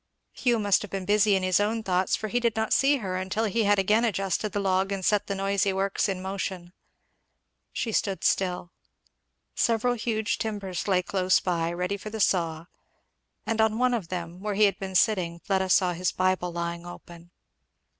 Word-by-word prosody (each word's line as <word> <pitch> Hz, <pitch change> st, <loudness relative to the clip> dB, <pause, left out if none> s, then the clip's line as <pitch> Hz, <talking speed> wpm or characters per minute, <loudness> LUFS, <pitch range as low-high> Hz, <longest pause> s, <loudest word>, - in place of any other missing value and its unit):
Hugh 240 Hz, -3 st, +1 dB
must 205 Hz, -3 st, +2 dB
have 210 Hz, -, -7 dB
been 195 Hz, -1 st, -4 dB
busy 205 Hz, 0 st, +3 dB
in 190 Hz, -, 0 dB
his 185 Hz, 0 st, +3 dB
own 220 Hz, +2 st, 0 dB
thoughts, 185 Hz, -2 st, +1 dB
for 215 Hz, -, -4 dB
he 240 Hz, +4 st, 0 dB
did 235 Hz, -2 st, 0 dB
not 220 Hz, 0 st, 0 dB
see 280 Hz, +1 st, +4 dB
her 190 Hz, -7 st, -4 dB
until 190 Hz, +4 st, -1 dB
he 220 Hz, +1 st, 0 dB
had 205 Hz, 0 st, +4 dB
again 210 Hz, +4 st, +3 dB
adjusted 195 Hz, -1 st, -1 dB
the 205 Hz, -, -2 dB
log 190 Hz, 0 st, +1 dB
and 195 Hz, -2 st, -3 dB
set 210 Hz, -1 st, +2 dB
the 200 Hz, -, -2 dB
noisy 195 Hz, 0 st, +1 dB
works 195 Hz, +2 st, 0 dB
in 185 Hz, -1 st, -3 dB
motion. 190 Hz, -2 st, -5 dB, 1.0 s
She 230 Hz, -, -3 dB
stood 195 Hz, -2 st, -1 dB
still. 180 Hz, -2 st, 0 dB, 0.8 s
Several 235 Hz, +1 st, +1 dB
huge 220 Hz, -2 st, -2 dB
timbers 200 Hz, -5 st, -4 dB
lay 185 Hz, -2 st, +2 dB
close 185 Hz, -1 st, +2 dB
by, 170 Hz, -2 st, -1 dB
ready 180 Hz, +3 st, -2 dB
for 215 Hz, -, -8 dB
the 220 Hz, +1 st, -6 dB
saw; 165 Hz, -5 st, +1 dB, 0.8 s
and 225 Hz, -1 st, 0 dB
on 220 Hz, 0 st, +2 dB
one 250 Hz, +1 st, +2 dB
of 215 Hz, -8 st, -2 dB
them 175 Hz, 0 st, -6 dB
where 205 Hz, +1 st, -3 dB
he 215 Hz, -, +3 dB
had 200 Hz, -1 st, +3 dB
been 190 Hz, -1 st, -6 dB
sitting 180 Hz, -5 st, +2 dB
Fleda 190 Hz, +1 st, -1 dB
saw 180 Hz, -1 st, +3 dB
his 180 Hz, +2 st, -1 dB
Bible 185 Hz, -1 st, 0 dB
lying 170 Hz, 0 st, -4 dB
open. 175 Hz, -1 st, -12 dB
195 Hz, 195 wpm, -26 LUFS, 185-215 Hz, 1.0 s, see